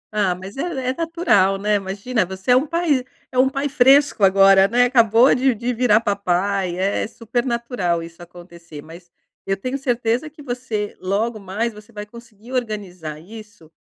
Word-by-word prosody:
Ah, 195 -4 +1
mas 190 +5 -10
é - - -2 0.3
é - - 0
natural, 325 - +1
né? 210 +2 0
Imagina 200 +4 -2
você 190 +5 -3
é - - +7
um 270 +5 +2
pai 320 -5 0 0.3
é 255 - -6
um 265 +1 +4
pai 275 +1 -2
fresco 275 -2 +4
agora, 195 0 +6
né, 245 +4 +3
acabou 235 0 +4
de 260 +1 +2
de 240 +3 -3
virar 235 -3 +3
papai 195 -3 -1
é 195 +3 -1
super 235 +2 -3
natural 235 -9 -2
isso 165 +1 -12
acontecer 170 -3 -12
mas, 170 +2 -14 0.3
eu 195 0 -1
tenho 255 +7 -4
certeza 245 +1 -1
que 305 0 -16
você 245 -5 -4
logo 215 +4 -1
mais 210 +4 -3
você 210 +2 -15
vai 210 -2 -7
conseguir 235 +1 -14
organizar 190 -10 -4
isso, 205 -2 -14
215 Hz, 175 wpm, -20 LUFS, 190-250 Hz, 0.3 s, é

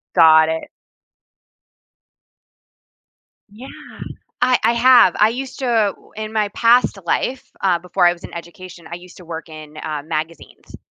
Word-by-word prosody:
Got 160 -1 +6
it. 160 0 -5 2.8
Yeah, 235 +6 -12 0.7
I 250 0 +3
I 230 - +4
have, 235 -5 +5
I 210 - +5
used 260 +3 -7
to 265 - -2
uh, 220 -4 +1
w - - -23
in 215 0 -6
my 215 -2 0
past 230 0 +2
life, 255 +9 -2
uh, 185 -3 +2
before 180 +1 0
I 175 - +4
was 175 - -14
in - - -10
education, 170 0 -11
I 170 - -5
used 180 0 -15
to 180 - -14
work 165 0 -8
in, 155 -1 -12
uh, 150 -2 -5
magazines, 160 +1 -7
180 Hz, 155 wpm, -19 LUFS, 165-230 Hz, 2.8 s, Got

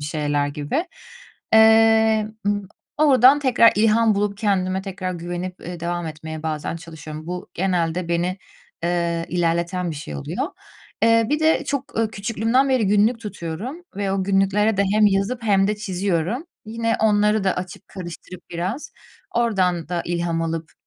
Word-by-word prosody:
şeyler 145 -2 0
gibi. 150 - -2 0.7
Eee, 220 -1 +5 0.2
ımm, 205 -2 -1 0.3
oradan 275 -2 +6
tekrar 250 -5 +5
ilham 220 0 +4
bulup 200 0 -1
kendime 190 -3 0
tekrar 185 -1 -4
güvenip, 175 +2 -5
eee, 175 0 -7
devam 175 0 -3
etmeye 160 0 -7
bazen 155 +1 -3
çalışıyorum. 155 -2 -9
Bu, 180 +1 -5
genelde 175 -1 -1
beni, 175 +2 -1 0.5
eee, 170 -1 0
ilerleten 170 +1 0
bir 155 - -5
şey 75 - -7
oluyor. 70 - -3 0.5
Eee, 230 0 +4
bir 300 +1 +1
de 315 +1 +3
çok, 280 -1 -4
ııı, 225 -1 +1
küçüklüğümden 225 +6 +1
beri 255 -5 +2
günlük 210 +4 +3
tutuyorum 210 - -6
ve 200 -1 -1
o 195 -1 0
günlüklere 200 +2 +2
de 200 - +3
hem 215 0 +5
yazıp 205 +5 0
hem 195 -3 +3
de 210 - 0
çiziyorum. 195 - -2 0.2
Yine 230 +1 -1
onları 210 -1 +3
da 190 - +1
açıp, 180 -1 -7
karıştırıp 180 -1 -9
biraz, 185 - -4 0.4
oradan 185 -9 +1
da 175 -1 -2
ilham 170 -1 -1
alıp, 165 -1 -4
195 Hz, 150 wpm, -22 LUFS, 170-220 Hz, 0.7 s, oradan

